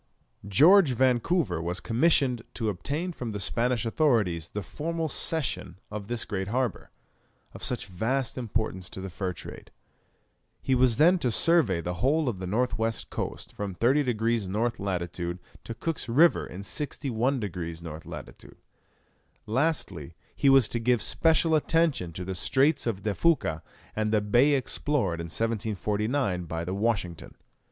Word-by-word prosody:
George 155 - +6
Vancouver 125 - +1
was 90 +2 -2
commissioned 125 - +2
to 110 -3 -1
obtain 145 - -3
from 120 -9 -5
the 105 - -4
Spanish 120 +5 0
authorities 110 - +1
the 105 - -5
formal 165 - -3
cession 145 - -1
of 105 -1 -6
this 120 0 -3
great 95 -2 -3
harbour, 125 +2 -2 0.6
of - - -10
such 125 - -1
vast 115 +7 -2
importance 110 -6 -3
to - - -8
the 95 0 -6
fur 95 +1 -3
trade. 90 - -10 0.9
He 135 - 0
was 125 -3 +3
then 175 +4 +5
to 125 - +1
survey 120 - +3
the 90 +2 -3
whole 150 +4 +2
of 110 -7 -2
the 95 - -4
north 110 +3 0
west 115 0 -2
coast, - - -5
from 100 -3 -5
30 130 +9 +3
degrees 115 -4 0
N. 115 +5 +1
lat. 90 -3 -2
to 85 0 -4 0.4
Cook's 165 -7 -3
River 160 +9 +4
in 95 +3 -8
61 135 0 -2
degrees 85 -5 -5
N. 80 -1 -6
lat. - - -9 1.0
Lastly, 105 - -1 0.2
he 140 - +3
was 135 -4 +6
to 120 - -2
give 120 0 +2
special 160 0 +2
attention 155 - +2
to 90 +2 -5
the 95 - -3
Straits 135 - +2
of 100 -4 -2
De 105 - 0
Fuca 100 - +1 0.3
and 110 0 0
the 110 - +4
bay 120 +8 +4
explored 130 - 0
in - - -5
1749 105 - -1
by 80 +1 -4
the 90 - -3
Washington. 100 -5 -2
115 Hz, 155 wpm, -27 LUFS, 95-135 Hz, 1.0 s, George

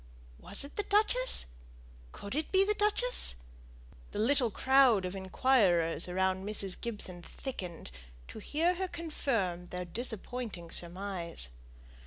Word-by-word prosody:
Was 200 - -3
it 280 - -11
the - - +2
duchess? 440 +5 +3 0.7
Could 200 - -8
it 305 +3 -2
be 385 0 +4
the 420 - +2
duchess? 420 - +3 0.7
The - - -8
little 245 +3 +2
crowd 260 -4 +4
of 180 +1 -4
inquirers 190 -4 +2
around 190 +1 0
Mrs. 200 -2 -1
Gibson 205 -6 -4
thickened, 180 - -7 0.4
to - - -8
hear 330 +4 +1
her 375 +1 -3
confirm 230 - -2
their 180 0 -5
disappointing 220 -3 -3
surmise. 175 - 0
210 Hz, 125 wpm, -31 LUFS, 180-285 Hz, 0.7 s, be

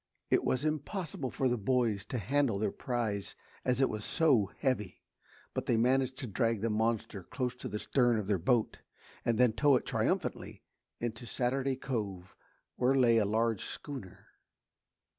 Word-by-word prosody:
It - - +4
was 130 +3 0
impossible 155 -2 -2
for 130 - 0
the 120 -2 0
boys 110 -2 +1
to 125 - -4
handle 125 +1 +1
their 105 - 0
prize 110 -5 -3 0.3
as 125 +1 +1
it 135 - +5
was 110 -1 -4
so 130 -12 +3
heavy, 110 -9 -1 0.5
but - - -3
they 115 - +3
managed 130 +2 +2
to - - -4
drag 115 -1 0
the 115 0 0
monster 110 -2 0
close 125 +6 -3
to - - -6
the 105 - -3
stern 120 +1 +2
of 105 - -2
their 100 -2 +1
boat 115 +5 +1 0.4
and 115 -2 +1
then 125 -2 +4
tow 140 +4 +4
it 125 - 0
triumphantly - - -1 0.4
in 120 -1 -1
to 115 +2 -11
Saturday 130 +3 0
Cove 100 -9 -4 0.4
where 130 +2 +3
lay 120 -3 +5
a 105 - +2
large 110 0 +1
schooner. 130 -11 -8
120 Hz, 170 wpm, -32 LUFS, 105-130 Hz, 0.5 s, it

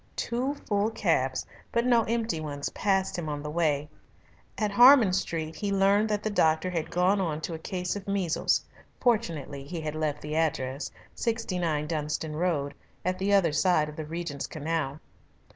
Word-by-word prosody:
Two 255 +4 -1
full 205 -6 0
cabs 150 - 0 0.3
but 235 +1 +1
no 240 -2 +5
empty 225 -7 -1
ones 145 -2 -4
passed 195 -1 0
him 160 -3 -4
on 145 -1 -4
the 150 - -4
way. 150 -3 +1 0.7
At 210 -2 0
Harman 240 -2 +7
Street 165 -4 -2
he 200 +5 -2
learned 200 +2 +3
that 210 -1 -1
the 215 - -1
doctor 160 -2 +2
had 165 -3 -2
gone 185 +3 +2
on 160 -4 -1
to 165 - -4
a 160 - -5
case 180 +2 -3
of 200 -1 -7
measles, 195 -5 +1 0.3
fortunately 165 - 0
he 165 +5 -5
had 155 -1 -3
left 155 -2 -2
the 150 +1 -4
address 140 -4 -1 0.2
69 180 -10 -1
Dunstan 155 0 -3
Road, 155 -4 0 0.3
at 185 0 0
the 195 +2 0
other 195 -5 +4
side 155 -1 +2
of 150 - -9
the 155 - -5
Regent's 160 -3 -4
Canal. 155 -2 -2
170 Hz, 175 wpm, -28 LUFS, 150-200 Hz, 0.7 s, Harman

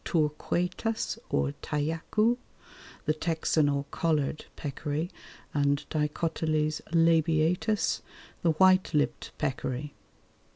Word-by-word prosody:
torquatus_ 175 +7 -1
or 70 0 +1
tajacu, 165 +10 +1 0.7
the 155 - +3
Texan 160 -2 +1
or 140 0 0
collared 155 -2 0
peccary, 150 +4 -3 0.4
and 145 0 +1
D. - - -6
labiatus, 160 +3 +1 0.4
the 170 - +3
white 185 +1 +4
lipped 145 - 0
peccary. 135 +1 -2
155 Hz, 85 wpm, -29 LUFS, 145-170 Hz, 0.7 s, white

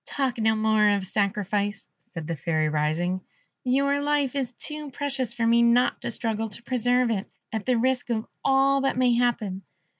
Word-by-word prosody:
"Talk 265 -4 -2
no 220 0 +3
more 215 -1 +3
of 200 -2 +1
sacrifice," 205 +1 -1
said 165 -3 -9
the 165 +1 -3
Fairy, 155 +1 0
rising; 155 +5 0 0.4
"your 280 +2 +1
life 290 -2 +1
is 260 -3 -1
too 300 +3 -4
precious 270 -2 -3
for 235 -1 -1
me 235 +1 +4
not 235 +1 +3
to - - -3
struggle 225 -1 -2
to 225 +3 -9
preserve 245 0 +1
it, 210 -1 -2 0.2
at 220 +1 -3
the 250 -2 +3
risk 255 +1 0
of 225 -2 -1 0.2
all 275 0 +3
that 270 -2 0
may 250 -1 +3
happen. 230 -6 0
235 Hz, 180 wpm, -25 LUFS, 205-255 Hz, 0.4 s, me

